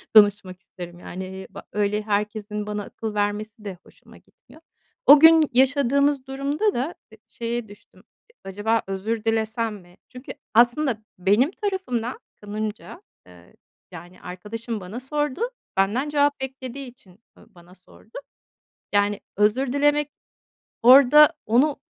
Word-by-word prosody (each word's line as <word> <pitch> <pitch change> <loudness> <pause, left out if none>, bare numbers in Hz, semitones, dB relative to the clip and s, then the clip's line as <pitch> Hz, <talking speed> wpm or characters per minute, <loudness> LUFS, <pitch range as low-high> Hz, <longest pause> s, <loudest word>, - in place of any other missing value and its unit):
danışmak 205 -3 +5
isterim, 175 -2 -11
yani, 190 +1 -8
ba - - -11
öyle 210 0 0
herkesin 210 0 -3
bana 210 0 -3
akıl 220 +2 -6
vermesi 210 +1 -3
de 190 -3 -6
hoşuma - - -19
gitmiyor. 315 - -22 0.4
O 290 - +9
gün 320 -1 +7
yaşadığımız 280 +1 +2
durumda 280 +10 -1
da, 270 +8 -3 0.2
eee, 220 - -16
şeye 235 0 -4
düştüm. 205 0 -18 0.3
Eee, 475 - -26
"Acaba 205 +4 -1
özür 210 +3 -3
dilesem 225 0 -1
mi?" 175 -1 -19
çünkü 250 +2 -9 0.2
aslında 240 0 +3
benim 205 - +2
tarafımda, 375 - -3 0.2
kanımca, 215 - -6 0.3
eee, 90 -1 -18 0.4
yani, 175 +1 -12
arkadaşım 215 +5 -6
bana 195 +5 -7
sordu, 295 - -3 0.4
benden 215 +9 +1
cevap 290 -1 +1
beklediği 265 0 -6
için, 210 -6 -18 0.2
ııı, - - -19
bana 175 +1 -18
sordu. 190 +4 -16 0.7
Yani, 205 0 +1 0.2
özür 240 +6 +2
dilemek, 290 +1 +2 0.7
orada 275 +4 +8
onu, 265 +7 +3
225 Hz, 130 wpm, -23 LUFS, 205-270 Hz, 0.7 s, O